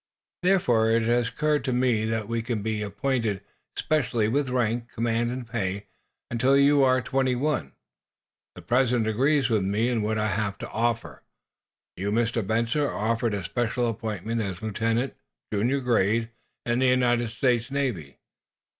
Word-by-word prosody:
"Therefore, 125 -13 +3
it 115 0 +3
has 120 +1 +1
occurred 150 -1 0
to 130 - 0
me 125 -3 +1
that 110 -1 -2
you 115 0 -1
can 115 -3 -3
be 110 -1 -2
appointed, 105 0 -1 0.3
specially, 120 -8 0
with 135 +4 0
rank, 120 -1 -1
command 115 +1 0
and 125 0 -5
pay, 100 -4 -3 0.5
until 130 +4 +3
you 140 0 +5
are 130 -1 +3
twenty 130 +1 +1
one. 135 - -1 0.8
The - - -11
President 125 -2 +2
agrees 135 +5 +2
with 110 -3 +2
me 105 +5 +1
in 120 -3 0
what 110 +1 -1
I 110 0 0
have 100 +1 -2
to - - -7
offer. 115 - -2 0.7
You, 100 +3 -3
Mr. 115 +1 +1
Benson, 115 +7 0
are 145 - 0
offered 115 +1 0
a 100 - -4
special 120 +6 -1
appointment 110 0 -3
as 95 -1 -5
lieutenant, 115 +4 -1 0.4
junior 120 +7 +1
grade, 115 -1 +1 0.3
in 120 +1 +1
the 130 - +3
United 120 -2 +2
States 120 0 0
Navy. 120 - -3
115 Hz, 160 wpm, -26 LUFS, 110-125 Hz, 0.8 s, you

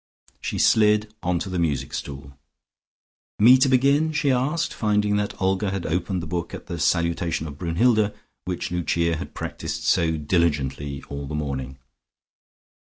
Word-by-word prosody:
She - - -3
slid 105 -1 +3
onto 90 +2 -1
the 90 -1 -2
music 75 -5 -1
stool. 70 0 -7 1.0
"Me 120 +5 +8
to 135 - +4
begin?" 140 +5 +3
she 150 -2 +2
asked, 135 +6 0
finding 105 -1 +1
that 105 0 -3
Olga 95 +2 +1
had 95 -2 -3
opened 90 +2 -1
the - - -4
book 85 +1 -4
at - - -10
the 85 -1 -5
salutation 85 0 0
of 75 -2 -8
Brunnhilde, 105 +5 +2 0.3
which 90 -2 -3
Lucia 85 -1 0
had - - -8
practised 80 -1 -5
so 80 -1 +2
diligently 75 -4 -1
all 70 0 -6
the 75 - -4
morning. 65 -3 -4
85 Hz, 150 wpm, -24 LUFS, 75-105 Hz, 1.0 s, Me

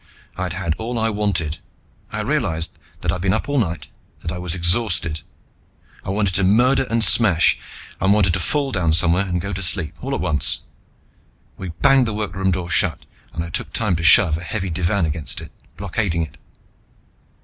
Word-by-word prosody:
I'd 90 -1 -3
had 90 -3 -2
all 120 +2 -4
I 110 0 +1
wanted. 90 -6 -1 0.5
I - - -3
realized 85 +2 -2 0.2
that 85 - 0
I'd 90 0 -4
been 95 0 +1
up 110 - -3
all 145 -1 +1
night, 85 -8 -3 0.3
that 80 - -4
I 90 - -5
was 90 -2 -1
exhausted. 85 -3 +1 0.8
I - - -7
wanted 100 -1 0
to 100 - +1
murder 125 +7 +3
and 115 0 +2
smash, 95 -5 +5 0.4
and 95 - +2
wanted 100 -4 +3
to 95 - 0
fall 140 +7 -1
down 85 -7 +1
somewhere 90 +3 +3
and 90 -1 -1
go 100 +3 -4
to 95 - -4
sleep, 90 -3 0
all 135 +2 -3
at - - -3
once. 75 -6 +3 0.9
We 95 - -7
banged 135 -3 +5
the 110 - -3
workroom 95 -2 -2
door 90 -1 -2
shut - - +1 0.3
and 85 - -4
I 85 - -8
took 120 +3 -4
time 105 -6 0
to - - -4
shove 85 -2 +6
a - - -9
heavy 95 +1 -4
divan 90 +2 0
against 75 -3 -3
it, - - -10 0.3
blockading 90 -3 -1
it. 80 - -10
95 Hz, 190 wpm, -20 LUFS, 85-105 Hz, 0.9 s, shove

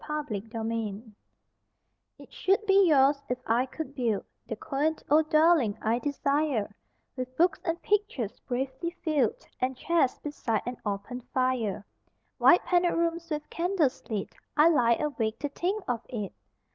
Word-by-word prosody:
OUR 300 0 -1
HOUSE 220 0 -3 1.1
It - - -15
should 395 +3 +1
be 390 -2 +5
yours, 280 -2 +4
if 250 - 0
I 240 +4 +2
could 280 +1 -6
build 235 -7 -1 0.2
The 225 - -3
quaint 295 +7 -1
old 310 +1 +4
dwelling 310 -9 +4
I 225 +2 +1
desire, 280 -5 0 0.4
With 255 0 -6
books 350 +2 +3
and 330 0 -1
pictures 405 - -1
bravely 265 +5 -3
filled 295 - +1
And 255 0 -1
chairs 330 -3 +1
beside 235 -7 -2
an 245 0 -4
open 205 +5 -4
fire, 255 -6 0 0.5
White 355 - +6
panelled 350 -1 +2
rooms 335 0 -1
with 300 -1 -3
candles 335 -5 0
lit 210 -4 -3 0.2
I 305 +3 +7
lie 240 -7 +4
awake 230 -7 -2
to 290 - -3
think 380 +8 -2
of 240 -2 -1
it! 210 -6 -4
270 Hz, 145 wpm, -28 LUFS, 230-325 Hz, 1.1 s, I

